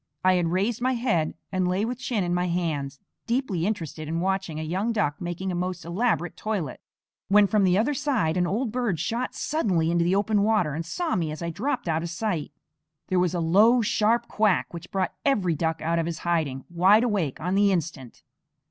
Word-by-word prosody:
I 185 - +6
had 175 -2 +1
raised 200 +7 0
my 255 +1 +2
head 215 -11 0 0.2
and 185 -1 0
lay 185 +4 0
with 245 +1 -4
chin 240 -5 -1
in 175 0 -1
my 180 0 0
hands, 155 -6 -2 0.3
deeply 230 -8 0
interested 165 -7 -4
in 165 +2 -2
watching 190 -3 -1
a - - -3
young 190 +8 -1
duck 170 -10 -1
making 175 +2 -3
a - - -3
most 180 0 -3
elaborate 175 -1 0
toilet, 195 -11 -3 0.5
when 205 +1 +6
from 210 0 +2
the 185 -1 +3
other 235 +8 +2
side 260 - 0
an 180 -1 +1
old 220 +5 -1
bird 235 -9 -1
shot 230 - -2
suddenly 185 - 0
into 170 0 +2
the 175 +3 +2
open 205 +1 +2
water 205 -8 +2
and 165 +2 -4
saw 335 - -1
me 165 -4 -1
as 155 +2 -6
I 170 - -2
dropped 245 - -2
out 160 -1 +1
of 170 - -4
sight. 170 -5 -2 0.6
There 185 - +2
was 180 -1 +1
a - - 0
low, 210 +9 +4
sharp 225 +3 +1
quack 210 -5 +1
which 170 -1 -8
brought 190 -2 -1
every 195 -11 +2
duck 160 0 -2
out 165 +1 +1
of 165 - -1
his 170 -2 -3
hiding, 155 -6 -1
wide 190 +6 +5
awake 200 - -1
on 180 +3 -2
the 200 0 +4
instant. 160 -9 -4
185 Hz, 210 wpm, -25 LUFS, 165-215 Hz, 0.6 s, I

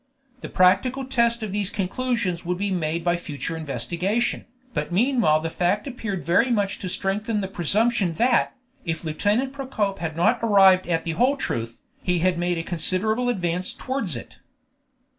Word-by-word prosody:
The - - -7
practical 250 +9 +3
test 235 -3 +1
of 210 - -4
these 200 -1 -1
conclusions 200 -2 -2
would 180 +1 -2
be 200 +1 -1
made 165 -2 -1
by 175 0 +2
future 160 -2 -5
investigation, 175 +8 -2 0.3
but - - -3
meanwhile 220 - +3
the 165 +1 -4
fact 180 +5 0
appeared 220 -8 -5
very 180 +10 +3
much 205 -4 0
to 185 - -4
strengthen 205 +4 -1
the 190 - -2
presumption 195 +1 +1
that, 240 +5 +2 0.3
if 165 -2 -3
Lieutenant 210 - 0
Procope 240 -8 -2
had 160 -1 -4
not 220 +8 +3
arrived 195 -5 +5
at 165 -2 0
the 165 - -2
whole 255 - +2
truth, 115 - -3 0.2
he 180 -1 +1
had 175 0 +1
made 175 0 0
a 165 - -2
considerable 215 +8 +1
advance 180 -5 -1
towards 255 - -2
it. 120 - -9
190 Hz, 165 wpm, -24 LUFS, 170-230 Hz, 0.3 s, arrived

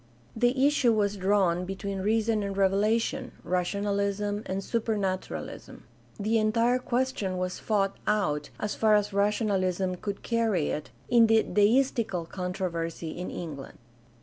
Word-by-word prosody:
The 245 +4 +2
issue 280 -5 +3
was 205 -1 +1
drawn 190 -3 +2
between 195 +1 -4
reason 220 +2 +1
and 200 -1 -4
revelation 215 +7 +1
— - - -23
^rational 200 +3 0
ism 205 +1 -2
and 190 +1 -2
supernaturalism. 205 -5 -3 0.4
The 220 +2 +2
entire 230 +3 +2
question 245 -7 -1
was 180 0 -3
fought 200 -3 0
out, 150 -9 0
as 210 - -2
far 215 -1 +4
as 210 -1 +1
rationalism 195 -3 +1
could 200 +2 -5
carry 225 -9 +1
it, 150 - -4 0.2
in 235 -2 +5
the 225 0 +4
deistical 215 -4 +2
con 180 0 -4
troversy 165 -3 -3
in 180 - -5
England. 150 -6 -7
205 Hz, 140 wpm, -28 LUFS, 185-225 Hz, 0.4 s, in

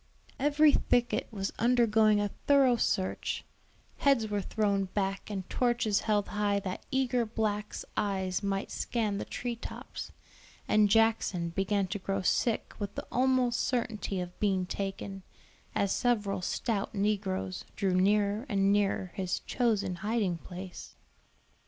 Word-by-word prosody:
Every 295 +2 +5
thicket 245 -3 +1
was 195 -3 -4
undergoing 225 -3 +4
a 205 -1 -1 0.2
thorough 275 -3 +6
search, 190 -4 -1 0.5
heads 270 -6 +3
were 205 -1 0
thrown 200 -1 0
back 195 +1 -2
and 190 -3 -4
torches 235 -5 +1
held 210 -2 0
high 205 -1 +1
that 185 -2 -5
eager 255 -2 +1
blacks 215 -2 -2
eyes 190 -2 -1
might 195 -1 -2
scan 215 -4 -1
the - - -4
tree 245 -1 -4
tops, 230 - -8 0.6
and 210 -1 +4
Jackson 220 -5 +2
began 195 +3 0
to 205 +2 -3
grow 195 0 -2
sick 230 +4 +1
with 205 -1 -4
the - - -4
almost 255 -1 +2
certainty 225 -6 -1
of 180 0 -6
being 190 -3 +1
taken, 195 +1 -4 0.5
as 200 -1 +1
several 210 -6 +1
stout 205 +2 -2
negroes 195 -2 -1
drew 190 -2 0
nearer 205 +5 +2
and 195 -2 +3
nearer 195 -2 +1
his 185 -1 -2
chosen 215 -7 0
hiding 205 -3 0
place. 180 +1 -9
205 Hz, 135 wpm, -30 LUFS, 195-230 Hz, 0.6 s, thorough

